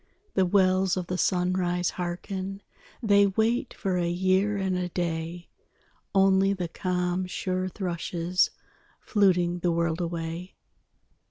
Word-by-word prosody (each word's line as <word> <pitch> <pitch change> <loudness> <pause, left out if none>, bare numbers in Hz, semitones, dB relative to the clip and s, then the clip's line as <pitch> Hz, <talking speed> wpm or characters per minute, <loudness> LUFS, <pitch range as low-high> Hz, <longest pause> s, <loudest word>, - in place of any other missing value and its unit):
_ - - -46
_The 185 - +2
wells 185 -1 +3
of 180 - -2
the 180 +1 -3
sunrise 180 -1 +1
harken, 190 +2 -4 0.4
They 200 -2 +5
wait 225 +5 0
for 185 -2 -1
a 170 -1 0
year 190 +3 +2
and 190 -1 0
a 180 0 -2
day: 170 0 -3 0.7
Only 195 0 +4
the 180 -3 -3
calm 180 +1 -1
sure 185 0 -2
thrushes 180 -1 0 0.5
Fluting 180 -4 +2
the 175 0 +1
world 170 0 0
away! 170 +1 -4
180 Hz, 125 wpm, -27 LUFS, 175-190 Hz, 0.7 s, They